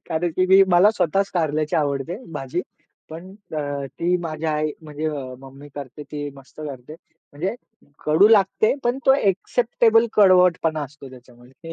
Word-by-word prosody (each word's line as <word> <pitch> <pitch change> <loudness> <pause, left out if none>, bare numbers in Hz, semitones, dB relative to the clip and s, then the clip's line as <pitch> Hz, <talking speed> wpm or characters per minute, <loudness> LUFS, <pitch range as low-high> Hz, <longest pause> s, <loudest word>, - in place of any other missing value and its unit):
कारण 165 +2 -1
की 185 0 +2
मी, 190 +1 +7
मला 180 +4 +6
स्वतःच 195 -1 0
कारल्याची 155 -2 0
आवडते 145 +3 -1 0.2
भाजी, 135 +4 -3 0.5
पण 170 +4 -9 0.3
अ, - - -1 0.4
ती 175 +1 +1
माझ्या 160 -1 -3
आई 150 0 -1
म्हणजे 155 0 -4 0.3
मम्मी 135 +2 -13
करते, 145 +1 -8
ती 145 0 -6
मस्त 135 +2 -15
करते. 140 -1 -8 0.4
म्हणजे 180 +9 -3 0.5
कडू 160 +8 +5
लागते, 215 +1 +3
पण 245 +2 0
तो 265 - +7
एक्सेप्टेबल 225 +1 +2
कडवटपणा 180 -6 +4
असतो 140 -1 -10
त्याच्यामध्ये. 125 +5 -14
160 Hz, 145 wpm, -22 LUFS, 145-190 Hz, 0.5 s, मी